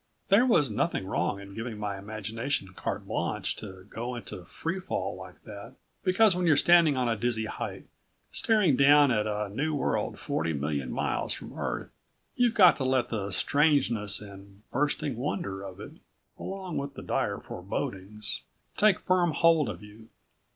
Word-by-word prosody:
There 215 +6 +5
was 150 - +3
nothing 105 - -1
wrong 100 +1 -1
in 100 0 -11
giving 115 +1 -5
my 100 -2 -4
imagination 110 +3 -3
carte 95 - -4
blanche - - -2
to 95 0 -9
go 120 +5 -5
into 95 -6 -8
free 170 +4 -4
fall 100 - -3
like 95 -1 -12
that, 100 -1 -10 0.3
because 190 +1 +4
when 180 -1 0
you're 155 -3 +5
standing 165 -3 +5
on 125 -1 +1
a 115 - +1
dizzy 110 0 0
height - - -6 0.5
staring 210 - +4
down 145 +1 +6
at 105 -2 +1
a 105 0 -2
new 150 +9 -1
world 145 - -1
forty 80 - -1
million 70 -2 -2
miles - - -1
from - - -9
Earth - - -4 0.4
you've 245 -2 +2
got 180 -4 +7
to 135 - -2
let 130 -2 +1
the 100 -3 -3
strangeness 130 -3 +2
and 100 0 -13
bursting 145 -1 0
wonder 120 - -3
of 95 -1 -9
it... 110 - -8 0.5
along 190 -3 -5
with 140 0 -4
the - - -8
dire - - -1
forebodings... 105 +2 -4 0.3
take 210 -3 +4
firm 180 -3 +2
hold 165 -4 +4
of 100 0 -7
you. 110 +2 -14
120 Hz, 165 wpm, -28 LUFS, 100-155 Hz, 0.5 s, got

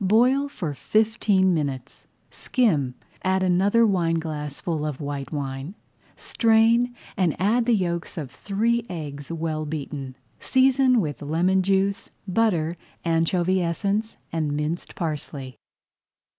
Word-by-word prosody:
Boil 250 +8 +4
for 170 - -4
fifteen 210 - +2
minutes, 140 -4 -4 0.2
skim, 155 - +1 0.3
add 190 0 +1
another 195 +6 +4
wineglassful 165 -4 -1
of 150 -3 -3
white 140 -2 -5
wine, 140 +3 -4 0.4
strain, 230 +2 +3 0.2
and 180 -7 0
add 230 +6 +2
the 240 - +5
yolks 170 -4 -2
of 145 -5 -5
three 220 +9 0
eggs 145 -4 -6
well 160 -2 -2
beaten. 145 -3 -5 0.2
Season 260 -2 +4
with 145 -8 -4
lemon 175 +6 +2
juice, 195 +1 0 0.2
butter, 175 -5 +1 0.3
anchovy 170 +3 +2
essence, 200 +6 -1
and 155 -3 -1
minced 150 +3 -3
parsley. 145 -5 -4
175 Hz, 115 wpm, -24 LUFS, 150-210 Hz, 0.4 s, the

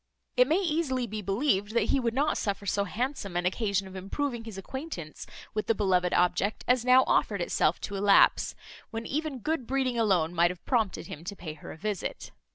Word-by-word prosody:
It 250 0 +5
may 315 +4 +3
easily 310 -8 0
be 215 -1 -5
believed, 205 +1 0
that - - +2
he 275 - +3
would 235 -2 -1
not 290 +3 +2
suffer 200 -1 -2
so 200 +1 0
handsome 220 -3 -3
an 175 - -1
occasion 200 0 0
of 190 - -11
improving 230 +5 -3
his 220 -4 -8
acquaintance 195 - -7 0.3
with 215 -1 -2
the 225 - +3
beloved 185 -3 +2
object 185 +4 +1
as 250 -1 +3
now 255 +1 +6
offered 200 -3 +1
itself 175 -1 +1
to 200 - -5
elapse, 200 0 +4 0.3
when 225 0 -5
even 305 -1 -2
good 285 -1 -2
breeding 260 -3 0
alone 180 -7 +2
might 175 0 +4
have 180 -1 -8
prompted 220 -9 0
him 155 -1 -8
to 200 - -5
pay 165 -5 -7
her 150 - -10
a - - -10
visit. 205 +2 -4
215 Hz, 200 wpm, -28 LUFS, 190-255 Hz, 0.3 s, now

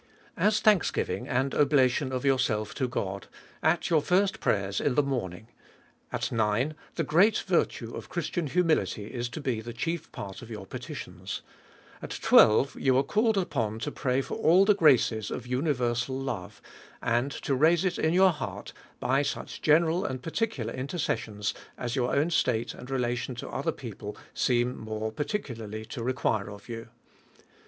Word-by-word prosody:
As 210 +1 +2
thanksgiving, 210 -5 +2
and 130 +2 0
oblation 135 -1 +3
of 130 +1 -2
yourself 125 -6 +1
to 130 -3 -1
God, 100 -5 -4 0.3
at 160 +2 +1
your 160 -2 +5
first 195 +6 +2
prayers 100 -1 0
in 135 - +1
the 145 - +4
morning; 110 -7 -3 0.6
at - - -2
nine, 115 +6 +1 0.2
the 165 - 0
great 175 +9 +4
virtue - - 0
of - - -8
Christian 170 -4 -2
humility 155 - +1
is 120 -1 -2
to 155 - -6
be 125 -6 -1
the 120 +1 -7
chief 165 +6 -3
part 120 -9 -7
of 120 - -11
your 105 -4 -7
petitions; - - -7 0.6
at - - -5
twelve, 120 +6 +6
you 130 -1 +3
are 135 - +4
called 215 +8 +2
upon 115 - -1
to 115 - -3
pray 130 0 0
for - - -6
all 180 +5 +5
the 210 - +6
graces 125 - +3
of 125 - -5
universal 125 -1 0
love, 120 -9 -5 0.4
and 120 +3 0
to 135 - -2
raise 160 +6 +4
it 180 -1 0
in 160 - +2
your 185 +2 +6
heart 150 -4 -6 0.3
by 135 +2 +2
such 145 0 -4
general 165 +3 +3
and 130 -1 -4
particular 160 - -2
interces 140 +6 -1
sions, 105 -2 -3 0.2
as 120 0 -3
your 125 -2 +1
own 150 +5 +2
state 120 -7 +1
and 125 - -11
relation 125 -1 -1
to 120 - -6
other - - -1
people - - -8 0.2
seem 125 0 +1
more 110 0 -4
particularly 115 - -4
to 120 - -6
require 115 -5 0
of 100 0 -11
you. 115 -1 -7
130 Hz, 165 wpm, -28 LUFS, 115-155 Hz, 0.6 s, twelve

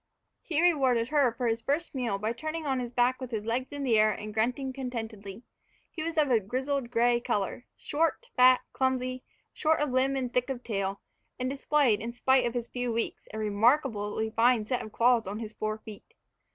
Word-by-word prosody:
HE 315 -3 -1
rewarded 260 -9 +3
her 285 -5 +3
for 245 +2 -4
his 230 0 0
first 295 +7 -1
meal 240 -7 -1
by 215 +3 -2
turning 310 +5 -5
on 265 -2 0
his 240 -1 -4
back 250 +1 +1
with 255 - -5
his 220 -3 -4
legs 245 +3 -2
in 285 -1 -5
the 230 -5 +3
air 215 0 +5
and 210 0 -6
grunting 250 +5 -1
contentedly. 225 -5 -6 0.5
He 325 - -6
was 330 +1 -3
of 295 -4 +3
a 235 - +5
grizzled 255 +5 -2
gray 240 0 +3
color, 235 -1 -2
soft, 330 +11 -1
fat, 255 0 +6
clumsy, 255 -1 -1 0.3
short 315 +1 +1
of 295 -2 0
limb 265 +2 +2
and 250 -2 -3
thick 250 +2 +1
of 250 -2 -4
tail, 195 -3 -2 0.4
and 255 - -1
displayed, 275 -5 +2
in 235 +1 -5
spite 260 0 +3
of 235 - -5
his 240 -1 -2
few 245 -1 -3
weeks, 230 0 -3
a 220 - -6
remarkably 220 0 +1
fine 230 0 +3
set 250 +3 -1
of 215 - -8
claws 235 -2 +3
on 200 +2 -4
his 220 -1 -6
fore 215 0 -3
feet. 220 - -13
245 Hz, 205 wpm, -29 LUFS, 220-270 Hz, 0.5 s, fat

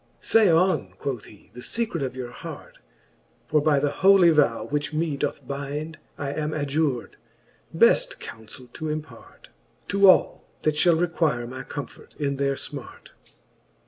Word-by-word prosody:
Say 220 -4 +4
on, 180 +3 +2
quoth 130 -6 -4
he, 105 -2 -17
the 125 - -10
fecret 225 - -3
of 130 -2 -3
your 125 -2 -6
hart: - - -10 0.7
For 150 -1 +2
by 150 -1 +3
the 140 +1 +1
holy 190 -3 +7
vow, 145 -7 +2
which 150 +1 -3
me 155 -1 -1
doth 140 +1 -3
bind, 145 +3 -5 0.2
I 140 -1 -3
am 155 +1 -2
adjur'd, 145 -3 -1 0.5
beft - - +3
counfell 115 +3 -11
to 155 - -5
impart 155 0 -8 0.4
To 200 -1 +6
all, - - +4 0.2
that 155 - +2
fliall 160 +2 +3
require 160 -8 0
my 130 +2 -7
comfort 145 -4 -9
in 140 -2 -1
their 140 0 0
fmart. - - -8
150 Hz, 150 wpm, -25 LUFS, 140-160 Hz, 0.7 s, holy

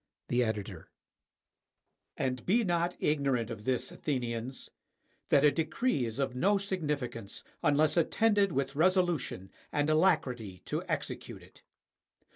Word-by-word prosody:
The 125 +1 +3
Editor] 110 -3 -4 1.3
And 130 -2 -1
be 230 +6 +3
not 175 -2 0
ignorant 135 -6 +1
of 110 -2 -7
this, 130 -2 0
Athenians, 125 -2 -3 0.6
that 140 - +5
a 150 - +7
decree 160 - 0
is 115 0 -5
of 135 -2 -1
no 200 +10 +3
significance 150 - -3 0.2
unless 150 +1 +3
attended 205 +3 +3
with 140 -1 -1
resolution 170 - +1 0.2
and 145 +1 +1
alacrity 125 - +1
to - - -2
execute - - -4
it. - - -19
145 Hz, 120 wpm, -31 LUFS, 125-175 Hz, 1.3 s, a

